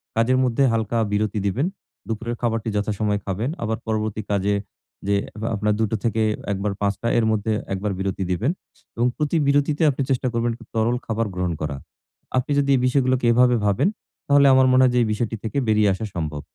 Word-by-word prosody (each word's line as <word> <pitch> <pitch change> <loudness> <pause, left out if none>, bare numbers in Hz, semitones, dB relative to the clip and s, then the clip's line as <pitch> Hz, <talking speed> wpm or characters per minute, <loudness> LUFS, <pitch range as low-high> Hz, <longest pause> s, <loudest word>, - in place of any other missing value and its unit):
কাজের 115 +3 +3
মধ্যে 125 +1 +2
হালকা 115 0 -1
বিরতি 105 0 0
দিবেন। 120 - 0 0.4
দুপুরের 115 +2 -3
খাবারটি 115 -2 -1
যথাসময়ে 105 0 0
খাবেন। 105 +6 -2
আবার 110 0 -1
পরবর্তী 110 -1 -1
কাজে 100 0 +1 0.5
যেয়ে 100 0 +2 0.3
আপনার 105 +1 +1
দুটো 110 0 0
থেকে 115 -1 0 0.3
১ 100 - -1
বার 105 -1 0
৫ 100 0 +2
টা 115 - -1
এর 115 - +3
মধ্যে 110 0 0 0.2
একবার 100 +2 -2
বিরতি 95 0 -2
দিবেন। 110 - +1 0.5
এবং 120 +1 +2
প্রতি 150 +2 0
বিরতিতে 145 +2 +2
আপনি 135 - -4
চেষ্টা 130 -1 +1
করবেন 115 0 0 0.2
তরল 115 +2 +2
খাবার 115 0 -1
গ্রহণ 90 -1 -1
করা। 75 -2 -2 0.6
আপনি 130 +4 0
যদি 140 -1 0
এই 125 - +1
বিষয়গুলোকে 130 -1 +2
এভাবে 125 +1 +4
ভাবেন, 105 - +2 0.4
তাহলে 140 -1 +5
আমার 130 0 +5
মনে 130 0 +5
হয় 130 - +4
যে - - +4
এই - - 0
বিষয়টি 115 +1 -2
থেকে 115 +5 -3
বেরিয়ে 105 -1 +4
আসা 110 +4 -4
সম্ভব। 75 -3 -3
110 Hz, 190 wpm, -22 LUFS, 105-125 Hz, 0.6 s, তাহলে